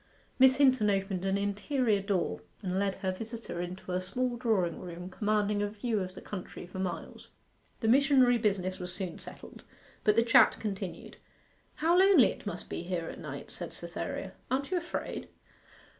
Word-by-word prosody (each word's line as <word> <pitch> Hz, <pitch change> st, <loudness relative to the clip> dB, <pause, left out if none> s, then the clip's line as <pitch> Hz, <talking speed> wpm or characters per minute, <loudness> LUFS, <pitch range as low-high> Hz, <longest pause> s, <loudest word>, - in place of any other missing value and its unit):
Miss 260 Hz, 0 st, +7 dB
Hinton 260 Hz, -7 st, +5 dB
opened 195 Hz, -2 st, 0 dB
an 195 Hz, 0 st, +2 dB
interior 205 Hz, +2 st, +1 dB
door 185 Hz, -, -1 dB, 0.2 s
and 185 Hz, 0 st, -1 dB
led 195 Hz, -1 st, 0 dB
her 190 Hz, -, -2 dB
visitor 225 Hz, -2 st, -5 dB
into 180 Hz, +1 st, -6 dB
a 180 Hz, 0 st, 0 dB
small 245 Hz, +7 st, -1 dB
drawing 215 Hz, -9 st, +1 dB
room 180 Hz, +1 st, -7 dB
commanding 210 Hz, 0 st, +1 dB
a 205 Hz, -, 0 dB
view 215 Hz, +1 st, -1 dB
of 185 Hz, -1 st, -4 dB
the -, -, -10 dB
country 185 Hz, -3 st, -7 dB
for 185 Hz, +2 st, -8 dB
miles. 185 Hz, -1 st, -4 dB, 0.5 s
The 225 Hz, -, 0 dB
missionary 260 Hz, -1 st, +5 dB
business 190 Hz, -4 st, 0 dB
was 180 Hz, 0 st, -5 dB
soon 185 Hz, -2 st, -5 dB
settled; -, -, -9 dB, 0.4 s
but 210 Hz, -, +4 dB
the 230 Hz, -, +5 dB
chat 230 Hz, -, +6 dB
continued. 195 Hz, -4 st, -5 dB, 0.6 s
'How 330 Hz, +3 st, +3 dB
lonely 380 Hz, -9 st, +7 dB
it -, -, -8 dB
must 180 Hz, -3 st, -5 dB
be -, -, -4 dB
here 175 Hz, -2 st, -3 dB
at -, -, -8 dB
night!' -, -, -7 dB
said -, -, -5 dB
Cytherea. -, -, -5 dB, 0.2 s
'Aren't 275 Hz, +5 st, -1 dB
you 370 Hz, -, +2 dB
afraid? 345 Hz, 0 st, -4 dB
205 Hz, 175 wpm, -30 LUFS, 185-240 Hz, 0.6 s, Miss